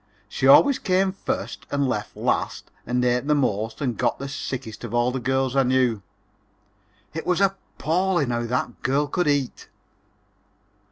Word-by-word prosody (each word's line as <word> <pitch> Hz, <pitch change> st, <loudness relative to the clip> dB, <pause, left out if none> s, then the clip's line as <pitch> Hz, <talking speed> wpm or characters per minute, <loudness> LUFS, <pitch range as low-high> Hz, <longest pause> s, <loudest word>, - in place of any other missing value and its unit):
She 130 Hz, -, -1 dB
always 275 Hz, -, +7 dB
came 190 Hz, 0 st, +1 dB
first 190 Hz, -, -5 dB
and 140 Hz, -1 st, 0 dB
left 105 Hz, -5 st, -3 dB
last -, -, -2 dB, 0.2 s
and 125 Hz, +1 st, +1 dB
ate 125 Hz, +2 st, +1 dB
the 150 Hz, -, +3 dB
most 110 Hz, -3 st, -1 dB
and 125 Hz, -5 st, -2 dB
got 120 Hz, -2 st, +1 dB
the 140 Hz, -, -5 dB
sickest 130 Hz, -5 st, -6 dB
of -, -, -4 dB
all 120 Hz, +1 st, +2 dB
the 130 Hz, -, -3 dB
girls 130 Hz, +1 st, 0 dB
I 135 Hz, -, +5 dB
knew. 125 Hz, -4 st, +2 dB, 1.1 s
It 160 Hz, -, -5 dB
was 180 Hz, 0 st, +2 dB
appalling 185 Hz, -5 st, 0 dB
how 120 Hz, 0 st, -1 dB
that 120 Hz, 0 st, -2 dB
girl 140 Hz, +3 st, +1 dB
could 175 Hz, +3 st, -1 dB
eat. 145 Hz, -3 st, -1 dB
130 Hz, 160 wpm, -24 LUFS, 120-150 Hz, 1.1 s, always